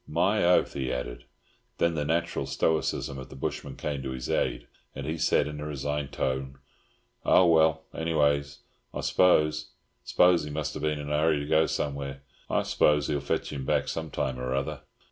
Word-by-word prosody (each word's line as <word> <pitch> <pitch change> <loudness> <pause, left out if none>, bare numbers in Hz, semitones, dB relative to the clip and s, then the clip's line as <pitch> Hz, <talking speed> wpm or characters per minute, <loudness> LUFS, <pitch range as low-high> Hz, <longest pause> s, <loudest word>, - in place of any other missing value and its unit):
"My - - +2
oath!" 90 +1 +3
he 65 -2 -2
added. - - -5 0.5
Then 85 0 +2
the 75 -2 -1
natural 80 -3 -1
stoicism 70 -1 0
of 65 - -9
the - - -11
bushman 65 - -4
came 70 -2 -3
to 65 - -4
his 65 -1 -4
aid, - - 0 0.3
and 70 - -5
he 80 +2 -2
said, - - +3
in 75 0 -6
a 75 - -5
resigned 75 0 -3
tone, 65 0 -2 0.7
"Oh, 95 - +5
well, 80 -1 +4
anyways, 75 -3 0 0.3
I - - -2
s'pose—s'pose 75 +1 +2
he 75 - -6
must 75 0 -3
have - - -6
been 75 0 0
in 75 0 -5
a 75 - +2
hurry 80 -1 +3
to - - -4
go 80 +1 +3
somewheres. 70 -1 -3 0.3
I - - +1
s'pose 75 -1 +2
he'll 75 -2 0
fetch 70 +1 -2
him 70 -2 -4
back - - +1
some 80 -1 -3
time 65 -2 -2
or 65 +1 -2
other." 70 0 -3
75 Hz, 185 wpm, -28 LUFS, 70-80 Hz, 0.7 s, Oh